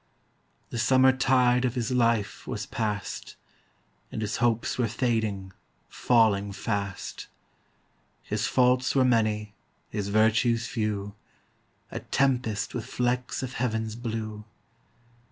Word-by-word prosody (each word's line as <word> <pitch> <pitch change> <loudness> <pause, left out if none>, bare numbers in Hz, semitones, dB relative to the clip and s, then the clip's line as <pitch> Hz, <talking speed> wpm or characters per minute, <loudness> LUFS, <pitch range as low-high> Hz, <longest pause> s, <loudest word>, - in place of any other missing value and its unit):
The 120 - -3
summer 130 +2 +5
tide 125 -1 +3
Of 125 -1 0
his 120 -1 -1
life 115 -4 +1
was - - -3
past, 105 -3 -4 0.8
And 110 - -3
his 105 - -2
hopes 120 +1 0
were 120 - +2
fading, 110 -5 -1 0.4
falling 105 -4 +2
fast. 100 -2 -4 1.0
His - - -1
faults 125 +1 +3
were 130 -1 +5
many, 110 -3 +1 0.4
his 100 -2 -2
virtues 115 +2 +3
few, 105 -3 -2 0.8
A - - -4
tempest 120 -5 0
with 120 -3 -4
flecks 125 +1 -1
of 125 -1 -5
heaven's 110 -3 -2
blue. 110 -2 -4
115 Hz, 115 wpm, -27 LUFS, 105-125 Hz, 1.0 s, summer